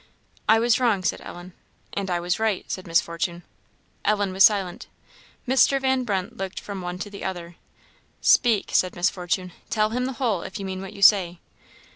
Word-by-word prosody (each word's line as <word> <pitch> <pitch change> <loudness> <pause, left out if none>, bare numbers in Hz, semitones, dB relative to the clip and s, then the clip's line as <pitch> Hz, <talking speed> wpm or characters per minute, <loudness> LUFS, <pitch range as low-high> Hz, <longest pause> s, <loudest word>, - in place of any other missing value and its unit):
"I 220 - +7
was 230 +1 +3
wrong," 225 -7 +2
said - - -1
Ellen. 175 +1 -10 0.4
"And 200 -1 -3
I 175 -1 0
was 175 +3 -1
right," 220 -4 0
said 185 - -5
Miss 165 0 +4
Fortune. 170 +1 -4 0.6
Ellen 205 -2 +1
was 190 +1 +4
silent. 195 -5 +3 0.6
Mr. 265 +2 +4
Van 265 -1 +1
Brunt 200 +1 -2
looked 195 -2 -4
from 200 -2 -7
one 180 0 -5
to 200 +2 -6
the 200 - -8
other. 175 -2 -5 0.6
"Speak," 230 -5 +3
said 185 - +2
Miss 175 +2 +2
Fortune; 180 0 -3 0.2
"tell 215 -1 +1
him 250 +2 -1
the 265 - -3
whole, 230 -8 -1
if 190 - -7
you 195 - -6
mean 190 0 -5
what 195 - -8
you 200 - -5
say." 185 -4 +5
195 Hz, 190 wpm, -24 LUFS, 180-220 Hz, 0.6 s, I